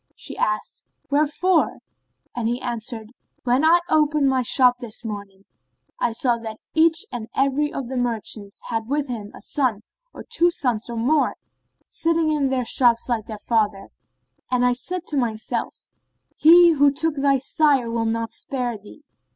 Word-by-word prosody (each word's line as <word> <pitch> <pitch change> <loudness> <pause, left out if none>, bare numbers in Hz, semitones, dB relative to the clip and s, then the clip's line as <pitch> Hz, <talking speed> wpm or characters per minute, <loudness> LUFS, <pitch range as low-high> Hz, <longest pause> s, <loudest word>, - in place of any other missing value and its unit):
She - - -7
asked, 215 0 -2 0.3
"Wherefore?" 310 +4 +2 0.6
and 240 -2 -1
he 240 +2 -1
answered, 230 -2 -5 0.3
"When 250 +3 +2
I 325 +2 +6
opened 300 -3 +2
my 260 -1 +2
shop 250 0 +4
this 240 -1 -7
morning, 200 -2 -7 0.5
I 235 - +1
saw 240 0 0
that 220 -1 -7 0.2
each 325 +1 +3
and 240 -3 -5
every 275 +2 +1
of 270 -3 -5
the 260 +1 -4
merchants 220 -4 -4
had 225 -1 -2
with 285 +2 -1
him 215 -4 -6
a - - -12
son 245 -7 -1 0.3
or - - -10
two 345 +1 +2
sons 245 -10 -2
or 235 - -5
more, 275 +6 +1 0.5
sitting 330 -1 +1
in 290 -3 +1
their 255 -2 -1
shops 235 -1 +2
like 230 -3 -1
their 215 - -6
fathers; 210 -3 -1 0.6
and 250 -1 +2
I 250 - +3
said 360 +8 -4
to 295 - -2
myself:—He 305 +8 +2
who 285 -2 +4
took 315 +1 -1
thy 275 0 +3
sire 270 -3 +2
will 230 -1 -1
not 225 0 -2
spare 245 -5 -4
thee. 210 +9 -15
250 Hz, 160 wpm, -22 LUFS, 225-295 Hz, 0.6 s, I